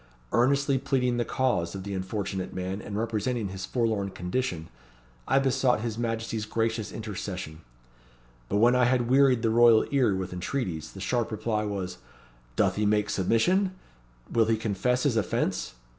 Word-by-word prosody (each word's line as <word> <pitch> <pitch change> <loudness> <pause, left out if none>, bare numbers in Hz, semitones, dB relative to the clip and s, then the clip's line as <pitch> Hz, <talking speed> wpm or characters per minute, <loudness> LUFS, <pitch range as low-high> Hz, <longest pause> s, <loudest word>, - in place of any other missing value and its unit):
Earnestly 140 +2 +2
pleading 125 -2 0
the 120 - +1
cause 120 -10 0
of 95 - -5
the 100 0 -5
unfortunate 95 0 -3
man, 95 +2 -3
and 100 0 -5
representing 115 0 -1
his 95 0 -6
forlorn 110 -5 0
condition, 90 -3 -3 0.6
I - - +3
besought 135 -3 +2
his 115 -1 -3
Majesty's 115 -1 -3
gracious 115 -1 -1
intercession. 95 -6 -6 0.9
But 100 - +1
when 120 +4 +5
I 125 -1 +4
had 120 -1 +1
wearied 130 -3 +4
the 115 - +2
royal 115 -1 +6
ear 130 -8 +3
with 95 -1 -4
entreaties, 90 - -3
the 95 - -9
sharp 120 +4 -1
reply 110 0 -1
was 95 -3 -4 0.6
'Doth - - +2
he 105 - +1
make 105 0 +1
submission? 185 - +2 0.6
Will 115 -1 +3
he 110 0 +1
confess 115 +4 0
his 130 -6 +2
offence?' 105 - -1
110 Hz, 160 wpm, -27 LUFS, 100-125 Hz, 0.9 s, royal